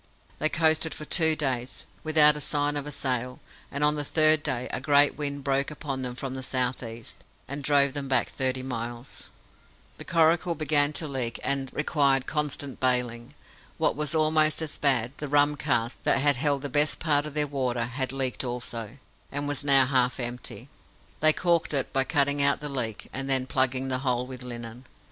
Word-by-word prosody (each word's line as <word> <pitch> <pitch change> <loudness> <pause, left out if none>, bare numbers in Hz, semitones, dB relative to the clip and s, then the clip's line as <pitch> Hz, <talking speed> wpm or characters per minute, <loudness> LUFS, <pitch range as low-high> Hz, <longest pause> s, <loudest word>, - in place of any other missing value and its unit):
They 155 - +2
coasted 160 0 +2
for 155 - -7
two 160 -2 +4
days, 130 -4 -2 0.2
without 155 -1 +5
a 150 - -5
sign 145 0 0
of 145 0 -3
a - - -5
sail, 125 -2 -2 0.3
and 140 +1 -2
on 150 0 +4
the 150 -1 -3
third 155 +1 +4
day 125 -3 -2
a - - -3
great 145 0 +4
wind 140 -1 -4
broke 140 0 0
upon 145 -3 -5
them 125 -1 -5
from 130 0 -5
the 130 - -5
south 130 -1 0
east, 115 -1 -8 0.3
and 140 +1 -6
drove 140 -1 +3
them 140 -1 -4
back 130 -2 +2
thirty 130 -1 -2
miles. 120 0 -5 0.7
The - - -7
coracle 170 +1 +2
began 145 -1 +2
to 155 - -1
leak, 125 -5 -2
and 135 -1 -1
required 140 -3 +1
constant 145 -3 -2
bailing. 125 -2 -1 0.4
What - - +1
was 150 +1 -2
almost 155 0 +3
as 155 - -1
bad, 130 -5 +1
the 150 - -5
rum 145 +1 +3
cask, 120 -3 -1
that - - +3 0.2
held 140 +1 0
the - - -2
best 145 +2 +3
part 150 -2 +1
of 150 - -9
their 150 -1 +2
water, 130 -4 -2
had 130 +2 -3
leaked 135 -1 -1
also, 120 -1 -5 0.3
and 145 +1 -3
was 145 -1 -1
now 135 -2 +6
half 130 -1 +1
empty. 120 0 -6 0.5
They 155 0 +6
caulked 170 -2 0
it, 135 - -1
by 135 0 +2
cutting 145 -1 +1
out 140 0 +3
the 150 - -5
leak, 120 -6 -4
and 135 +1 -4
then 130 -1 +2
plugging 130 0 0
the 130 0 -1
hole 125 -2 -1
with 130 -1 -9
linen. 120 0 -8
140 Hz, 190 wpm, -26 LUFS, 125-150 Hz, 0.7 s, now